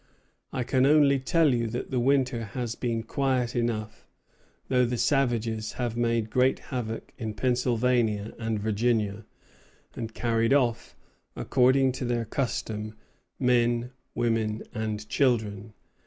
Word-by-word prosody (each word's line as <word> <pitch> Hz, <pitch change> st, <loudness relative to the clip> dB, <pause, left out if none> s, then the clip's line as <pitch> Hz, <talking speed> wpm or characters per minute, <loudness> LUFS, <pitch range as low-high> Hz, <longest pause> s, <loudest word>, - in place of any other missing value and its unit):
I 130 Hz, -, -2 dB
can 130 Hz, +2 st, +2 dB
only 145 Hz, -2 st, +5 dB
tell 155 Hz, +1 st, +3 dB
you 115 Hz, -1 st, 0 dB
that 120 Hz, +4 st, -5 dB
the 130 Hz, -, +1 dB
winter 130 Hz, -2 st, +2 dB
has 115 Hz, +2 st, -4 dB
been 115 Hz, -2 st, -2 dB
quiet 130 Hz, -1 st, 0 dB
enough, 110 Hz, -3 st, -2 dB, 0.6 s
though 125 Hz, -1 st, +3 dB
the 120 Hz, 0 st, -1 dB
savages 115 Hz, -4 st, 0 dB
have 120 Hz, -2 st, -3 dB
made 115 Hz, -2 st, 0 dB
great 130 Hz, +1 st, +3 dB
havoc 115 Hz, -3 st, -5 dB
in 110 Hz, -3 st, -4 dB
Pennsylvania 120 Hz, -3 st, +1 dB
and 110 Hz, -2 st, -1 dB
Virginia, 110 Hz, 0 st, 0 dB, 0.7 s
and 115 Hz, -1 st, -5 dB
carried 115 Hz, +1 st, +1 dB
off, 120 Hz, -5 st, +1 dB, 0.4 s
according 130 Hz, +1 st, +3 dB
to 125 Hz, 0 st, -4 dB
their 120 Hz, -1 st, -1 dB
custom, 110 Hz, -3 st, -3 dB, 0.4 s
men, 120 Hz, -1 st, +2 dB, 0.2 s
women, 110 Hz, -2 st, 0 dB
and 105 Hz, -1 st, -3 dB
children. 110 Hz, -6 st, 0 dB
120 Hz, 125 wpm, -27 LUFS, 110-125 Hz, 0.7 s, only